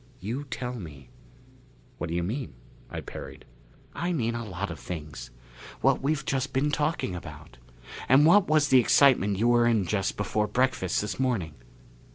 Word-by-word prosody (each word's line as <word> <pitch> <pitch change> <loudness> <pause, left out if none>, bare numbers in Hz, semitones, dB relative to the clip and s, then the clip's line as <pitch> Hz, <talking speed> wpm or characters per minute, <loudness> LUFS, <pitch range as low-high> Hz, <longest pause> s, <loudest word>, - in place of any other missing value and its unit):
You 120 +10 -4
tell 125 -1 -5
me." 75 - -10 0.9
"What 85 - -3
do 85 - -2
you 85 - 0
mean?" 110 - -4 0.3
I - - -5
parried. - - -9 0.5
"I 175 +1 -2
mean 115 -7 -1
a 120 0 -4
lot 95 -6 -5
of - - -8
things. 75 -8 -7 0.5
What - - +3
we've 140 +1 -1
just 135 0 -2
been 145 +3 +1
talking 150 - -1
about. 75 -7 -10 0.5
And 135 +3 +6
what 185 +4 +6
was 155 -1 +3
the 130 - +7
excitement 120 -5 +4
you 115 +4 +2
were 120 -1 +4
in 110 -5 +2
just 95 +2 -1
before 105 +1 0
breakfast 125 -8 0
this 105 +3 -4
morning?" 115 -12 -1
115 Hz, 170 wpm, -27 LUFS, 90-135 Hz, 0.9 s, the